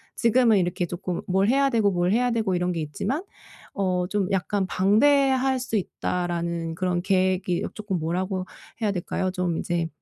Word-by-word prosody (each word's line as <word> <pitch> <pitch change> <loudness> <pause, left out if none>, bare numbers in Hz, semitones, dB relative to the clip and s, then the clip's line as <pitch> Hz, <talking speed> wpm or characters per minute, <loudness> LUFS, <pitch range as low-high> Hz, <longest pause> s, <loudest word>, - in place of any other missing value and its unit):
지금은 235 -2 +4
이렇게 175 0 -1
쪼끔 175 +1 -4
뭘 190 +2 +2
해야 275 +1 +3
되고 220 -4 +3
뭘 180 -1 +1
해야 245 +2 +2
되고 220 -5 0
이런 180 0 0
게 165 -2 -2
있지만 200 - -3 0.5
어 185 -3 0
좀 200 -2 0
약간 195 0 0
'방대할 265 +7 +3
수 250 -2 -3
있다.'라는 170 -4 -2
그런 180 0 -1
계획이 185 -1 +1
쪼끔 210 -4 -3
뭐라고 185 +3 -2 0.4
해야 210 -2 +1
될까요? 185 0 -2
좀 180 -3 -1
이제 170 -2 -1
185 Hz, 325 characters per minute, -25 LUFS, 175-215 Hz, 0.5 s, 지금은